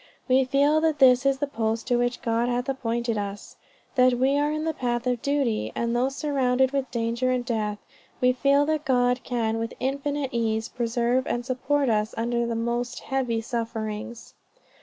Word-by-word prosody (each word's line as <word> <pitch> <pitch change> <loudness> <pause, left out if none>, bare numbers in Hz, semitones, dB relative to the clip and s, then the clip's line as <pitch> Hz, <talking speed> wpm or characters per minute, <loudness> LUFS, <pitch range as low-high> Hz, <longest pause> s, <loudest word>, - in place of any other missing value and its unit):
We 260 0 +4
feel 285 +4 +3
that 315 -2 +1
this 260 -1 +5
is 275 -1 +2
the 290 - -1
post 225 -4 -2
to 245 - +1
which 245 0 -1
God 235 +1 +1
hath 245 +1 -1
appointed 235 -4 -1
us; 200 0 -6 0.4
that 255 -2 +4
we 265 +3 +2
are 290 +1 +1
in 310 0 -2
the 320 0 -1
path 240 -3 -2
of 250 -2 0
duty; 280 -6 0
and 235 0 -1
though 250 +2 +2
surrounded 265 -2 +1
with 275 -2 -1
danger 235 +1 -1
and 250 -1 0
death, 215 -4 -1 0.4
we 250 0 +4
feel 280 +2 +3
that 310 0 -1
God 250 -2 +2
can 225 -2 -1
with 230 0 -4
infinite 280 +1 -2
ease, 225 -1 -1
preserve 240 +2 0
and 240 0 -2
support 270 +2 0
us 215 -2 0
under 235 +1 0
the 230 - -2
most 235 +1 -2
heavy 250 -4 -1
sufferings. 225 -1 -5
245 Hz, 180 wpm, -25 LUFS, 230-270 Hz, 0.4 s, this